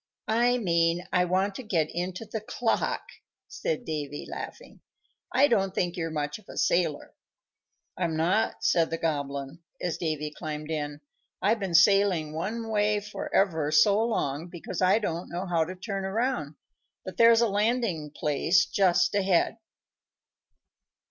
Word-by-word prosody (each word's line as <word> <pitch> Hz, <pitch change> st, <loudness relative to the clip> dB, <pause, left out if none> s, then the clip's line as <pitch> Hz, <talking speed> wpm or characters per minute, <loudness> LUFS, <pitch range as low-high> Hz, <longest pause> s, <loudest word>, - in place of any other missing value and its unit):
"I 240 Hz, +3 st, +3 dB
mean 170 Hz, -4 st, +1 dB
I 180 Hz, -1 st, +3 dB
want 190 Hz, +3 st, +1 dB
to 230 Hz, -, -6 dB
get 170 Hz, -10 st, 0 dB
into 180 Hz, +5 st, -4 dB
the 220 Hz, 0 st, -5 dB
clock," 225 Hz, +2 st, -1 dB, 0.4 s
said 485 Hz, -, -3 dB
Davy, 145 Hz, -3 st, -4 dB
laughing. -, -, -8 dB, 0.5 s
"I 265 Hz, +4 st, +5 dB
don't 195 Hz, -6 st, +1 dB
think 175 Hz, -1 st, 0 dB
you're 165 Hz, -2 st, -2 dB
much 150 Hz, +2 st, -3 dB
of -, -, -21 dB
a -, -, -9 dB
sailor." 170 Hz, -4 st, 0 dB, 0.8 s
"I'm 170 Hz, -3 st, -1 dB
not," 185 Hz, +7 st, +1 dB
said 165 Hz, -2 st, +3 dB
the 165 Hz, -, -2 dB
Goblin, 140 Hz, -2 st, -3 dB, 0.2 s
as 175 Hz, -3 st, -3 dB
Davy 150 Hz, -2 st, -2 dB
climbed 155 Hz, -1 st, -5 dB
in. 145 Hz, -1 st, -3 dB, 0.4 s
"I've 215 Hz, +3 st, +2 dB
been 190 Hz, -4 st, -2 dB
sailing 180 Hz, -3 st, +4 dB
one 220 Hz, +8 st, -3 dB
way 210 Hz, 0 st, +2 dB
for 210 Hz, +1 st, -7 dB
ever 160 Hz, -6 st, +2 dB
so 200 Hz, +7 st, +5 dB
long, 160 Hz, -9 st, -1 dB
because 175 Hz, +1 st, -6 dB
I 185 Hz, +3 st, +5 dB
don't 175 Hz, -5 st, -3 dB
know 175 Hz, +2 st, -4 dB
how 170 Hz, -3 st, +1 dB
to 185 Hz, +3 st, -7 dB
turn 195 Hz, +1 st, -4 dB
around; 190 Hz, -, -1 dB, 0.5 s
but 185 Hz, -, -7 dB
there's 230 Hz, 0 st, +6 dB
a 235 Hz, -, +4 dB
landing 205 Hz, -6 st, 0 dB
place 150 Hz, +4 st, +2 dB
just 190 Hz, -3 st, +2 dB
ahead." 195 Hz, +2 st, +2 dB
180 Hz, 150 wpm, -27 LUFS, 160-210 Hz, 0.8 s, there's